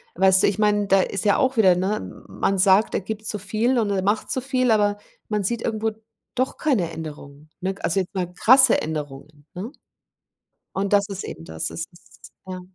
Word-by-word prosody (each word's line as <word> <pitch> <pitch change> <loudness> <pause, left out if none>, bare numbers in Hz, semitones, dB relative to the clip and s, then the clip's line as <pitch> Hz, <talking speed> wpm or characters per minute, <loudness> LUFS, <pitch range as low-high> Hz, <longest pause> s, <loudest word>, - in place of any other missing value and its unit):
Weißt 190 +1 +5
du, - - +5
ich 200 +1 -1
mein, 205 -1 +2
da 195 -1 +4
ist 200 +2 -3
ja 205 - +4
auch 260 -3 +1
wieder 185 -5 +5
ne, 195 +4 -3
man 195 - -1
sagt, 195 +3 +4
er - - 0
gibt 215 +2 -6
so 210 - -2
viel 225 +6 0
und 210 -2 0
er 190 -2 0
macht 205 +2 0
so 260 - -1
viel, 255 -2 +1
aber 205 -1 +2 0.3
man 210 -2 -1
sieht 235 +4 -1
irgendwo 220 0 -1 0.4
doch 255 +1 -1
keine 220 - 0
Änderungen, 150 -2 -9
ne? 190 +1 -2
Also, 185 +3 +1
jetzt 185 - -8
mal 180 -1 -2
krasse 260 +7 +5
Änderungen, 145 -1 -7
ne? 200 +8 -6 1.0
Und 195 +1 -2
das 200 -1 +4
ist 195 -1 -6
eben 80 - -8
das, 80 0 -4
es 165 - -4
ist 175 - -18
Ja. 185 -1 -6
200 Hz, 200 wpm, -23 LUFS, 180-220 Hz, 1.0 s, Weißt